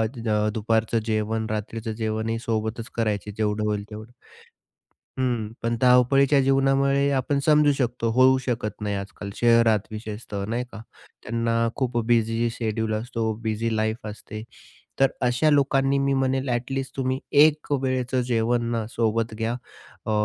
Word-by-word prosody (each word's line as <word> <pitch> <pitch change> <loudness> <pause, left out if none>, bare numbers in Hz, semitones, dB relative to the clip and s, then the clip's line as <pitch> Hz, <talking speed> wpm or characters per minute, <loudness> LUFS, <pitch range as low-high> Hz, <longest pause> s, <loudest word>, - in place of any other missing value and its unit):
The 115 -1 -4 0.2
दुपारचं 110 +1 +1
जेवण, 110 0 -1
रात्रीचं 110 +1 -4
जेवणही 110 0 -2
सोबतचं 115 +1 -3
करायचे. 105 -2 -1
जेवढं 105 0 0
होईल 105 -1 -1
तेवढं. 110 +2 -9 1.1
हं, 120 -4 -1
पण 115 0 0
धावपळीच्या 135 +3 +5
जीवनामुळे 135 +1 +2
आपण 140 +1 0
समजू 150 -1 +5
शकतो, 125 -3 -1
होऊ 130 +2 +5
शकत 120 -6 -3
नाही 105 -1 -2
आज-काल, 100 +1 -7
शहरात 115 -3 +3
विशेषतः 105 -2 -6
नाही 120 +2 -1
का. - - -8 0.4
त्यांना 115 0 0
खूप 125 -3 -1
बिझी 115 0 +2
शेड्यूल 110 -1 -2
असतो. 115 0 -2
बिझी 110 +1 -1
लाईफ 110 0 -2
असते. 110 0 -8 0.6
तर 135 -1 +5 0.2
अशा 125 +6 +2
लोकांनी 140 -1 +2
मी 140 0 +1
म्हणेल, 135 0 0
ॲट 120 +2 -2
लीस्ट 135 -1 -4
तुम्ही 130 0 -1 0.2
1 155 -1 +2
वेळेचं 130 -2 0
जेवणं 115 -1 0
सोबत 115 -1 0
घ्या. 115 +1 -1 0.5
अ, - - -1
115 Hz, 140 wpm, -24 LUFS, 110-130 Hz, 1.1 s, धावपळीच्या